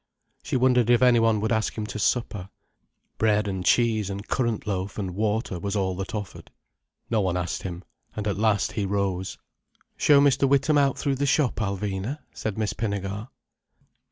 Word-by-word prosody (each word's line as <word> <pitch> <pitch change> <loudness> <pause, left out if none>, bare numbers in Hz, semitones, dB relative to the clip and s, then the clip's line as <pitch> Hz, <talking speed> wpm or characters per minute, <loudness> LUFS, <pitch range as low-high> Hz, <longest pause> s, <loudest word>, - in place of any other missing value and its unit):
She - - -3
wondered 125 -2 +3
if 120 +1 +5
any 125 -2 +6
one 115 -2 +3
would 110 - -1
ask 110 0 0
him 110 - -2
to 105 - -6
supper—bread 105 0 -2
and 95 -2 -3
cheese 110 -2 +2
and 100 +1 -6
currant 120 -5 -1
loaf, 95 -1 -3
and 95 -3 -3
water, 105 -2 -1
was 100 +3 -3
all 95 -2 0
that 95 +3 -4
offered. 100 -3 -7 0.6
No 110 -2 +2
one 95 -2 0
asked 90 -1 -3
him, 90 -1 -6 0.3
and 105 -1 -3
at 100 - 0
last 105 -3 +2
he 105 - -2
rose. 95 -2 -2 0.6
"Show 145 -2 +5
Mr. 140 -1 +3
Witham 140 +2 +3
out 140 -2 +2
through 140 -2 -1
the 140 +1 0
shop, 135 -2 +2
Alvina," 100 +4 -2 0.2
said 110 -2 -4
Miss 105 -1 -1
Pinnegar. 100 0 -3
105 Hz, 175 wpm, -25 LUFS, 100-120 Hz, 0.6 s, any